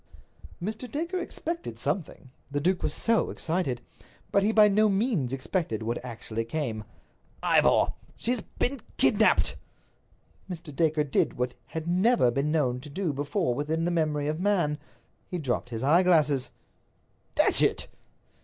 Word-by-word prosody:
Mr. 220 +7 -5
Dacre 340 +5 -2
expected 335 -1 -5
something. 145 -7 -3 0.2
The 145 +1 -1
duke 180 +4 +1
was - - 0
so 230 -1 +1
excited. 160 -8 -2 0.5
But 200 - +4
he 210 +2 +2
by 215 -1 +7
no 210 +1 +4
means 195 - +1
expected 135 - -2
what 120 +2 -3
actually 115 -2 -4
came. 115 -4 -3 0.6
"Ivor, - - +4 0.2
she's 240 -1 0
been 270 +2 -2 0.2
kidnaped!" - - +3 0.9
Mr. 165 -5 -7
Dacre 155 0 +2
did 140 - +1
what 125 0 0
he - - -26
had 160 +3 -5
never 185 - +3
been 140 +4 0
known 130 -6 +1
to 145 +3 -10
do 165 +1 -2
before 145 +2 0
within 155 +5 -1
the 175 - +1
memory 155 -3 0
of 155 +2 -2
man—he 180 -2 -2
dropped 125 -6 -2
his 115 0 -4
eyeglass. 150 -5 +4 0.9
"Datchet!" - - +3
160 Hz, 140 wpm, -27 LUFS, 135-195 Hz, 0.9 s, by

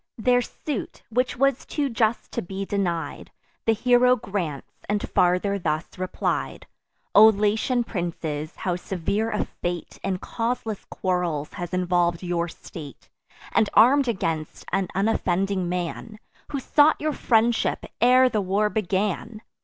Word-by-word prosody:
Their 245 +2 +3
suit, 275 0 -5
which 250 +3 0
was 275 0 +2
too 290 -2 -1
just 230 -2 0
to - - -2
be 195 +2 -5
denied, 180 -5 -2 0.4
The 225 - +5
hero 250 +2 +4
grants, 195 - -4 0.2
and 205 0 0
farther 180 +3 +2
thus 155 -2 -1
replied: 185 0 -2 0.5
"O 215 +2 +9
Latian 220 +4 +2
princes, 165 -7 -4
how 180 -2 -2
severe 195 +5 -2
a 210 -2 -1
fate 175 -1 -5
In 190 -1 -1
causeless 230 0 -3
quarrels 175 -5 -2
has 175 -1 -5
involv'd 175 -1 +1
your 175 -1 -1
state, 155 -4 -11 0.4
And 215 - +3
arm'd 260 +5 +6
against 165 -8 -2
an 195 0 +1
unoffending 195 -2 0
man, 180 +5 -4 0.3
Who 280 - -1
sought 295 +4 +4
your 305 0 -1
friendship 230 -2 +1 0.2
ere 255 +2 +6
the 215 -4 0
war 200 +3 +1
began! 210 +1 -2
200 Hz, 135 wpm, -24 LUFS, 175-230 Hz, 0.5 s, O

